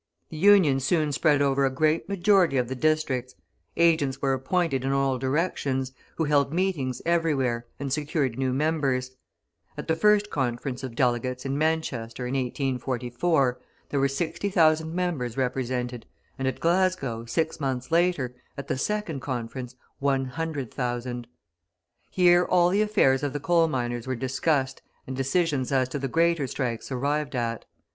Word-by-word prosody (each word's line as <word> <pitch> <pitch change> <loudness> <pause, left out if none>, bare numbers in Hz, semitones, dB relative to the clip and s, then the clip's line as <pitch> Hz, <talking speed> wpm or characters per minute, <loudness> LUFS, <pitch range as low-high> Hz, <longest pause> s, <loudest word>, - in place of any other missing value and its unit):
The 160 - -8
Union 180 -7 +5
soon 155 +2 +1
spread 145 0 +3
over 140 0 +2
a 135 - +3
great 155 +6 0
majority 190 -5 +3
of 125 -1 +1
the - - -2
districts; 135 -3 0 0.4
agents 160 -5 +3
were 135 -1 +1
appointed 135 0 0
in 135 - 0
all 135 -1 +1
directions, 135 -2 -1 0.2
who 160 - 0
held 145 -2 +2
meetings 165 -8 -1
everywhere 140 -9 +1
and 135 -1 -2
secured 145 -4 -1
new 130 0 0
members; 135 -3 0 0.6
at - - -6
the 160 - +2
first 210 +3 +3
conference 125 -1 -2
of 130 -3 -6
delegates, 125 +1 0
in 135 0 -1
Manchester, 140 -6 -1
in 125 - -3
1844, 130 +1 0 0.3
there 140 - 0
were 135 - +3
60,000 160 +1 +1
members 165 -10 -2
represented, 125 -2 -2 0.3
and 135 - -1
at 130 - -2
Glasgow, 170 -10 +1
six 160 +8 -1
months 130 -1 -3
later, 165 -7 +2 0.2
at 140 - -6
the 130 - -2
second 210 -5 -2
conference, 125 -1 -5 0.2
100,000. 130 -3 -2 0.8
Here 175 -1 +5
all 180 -1 +3
the 200 +3 +2
affairs 135 -11 +3
of 145 -2 -2
the 145 - -2
coal 170 +2 +3
miners 120 -4 -3
were 130 - -1
discussed 130 +2 -1 0.2
and 130 - -5
decisions 135 0 0
as 130 -2 +2
to 145 - -3
the 135 - -2
greater 165 0 +2
strikes 125 -2 -3
arrived 145 +2 -1
at. 115 -2 -2
135 Hz, 150 wpm, -26 LUFS, 130-160 Hz, 0.8 s, Union